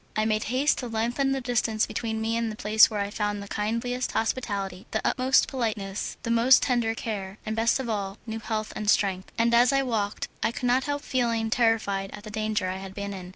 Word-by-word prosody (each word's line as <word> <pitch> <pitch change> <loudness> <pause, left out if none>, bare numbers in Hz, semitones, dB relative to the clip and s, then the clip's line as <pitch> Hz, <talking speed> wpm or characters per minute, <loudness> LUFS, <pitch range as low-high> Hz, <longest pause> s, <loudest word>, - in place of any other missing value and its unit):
I 215 - +1
made 215 -1 0
haste 260 +5 +1
to 250 - -4
lengthen 240 +4 0
the 270 0 -1
distance 235 -3 +1
between 220 -1 -3
me 225 +1 0
and 230 -1 -1
the - - -7
place 215 +1 +5
where 210 -2 -2
I - - +2
had 200 +1 -6
found 205 -1 -2
the - - -9
kindliest 230 +5 -2
hospitality, 200 -5 -2
the 220 - -1
utmost 260 +1 +3
politeness, 215 -6 -3
the 230 - -1
most 235 +3 +6
tender 235 -4 +1
care, 200 -4 -5
and 215 0 -2
best 230 +3 +2
of 260 - -3
all, 200 -3 -3
new 225 -1 -4
health 215 -1 -3
and 210 -1 -2
strength, 190 -3 +1
and 235 +1 +2
as 240 +1 +6
I 275 0 +2
walked 215 -5 -2
I - - +1
could 245 - -5
not 250 +2 +2
help 290 0 -2
feeling 230 -5 0
terrified 220 -5 +1
at 205 - -9
the 215 - -8
danger 215 -2 -1
I 185 +1 -3
had 190 0 -9
been 200 0 -4
in. 185 -2 -8
220 Hz, 230 wpm, -26 LUFS, 205-240 Hz, -, most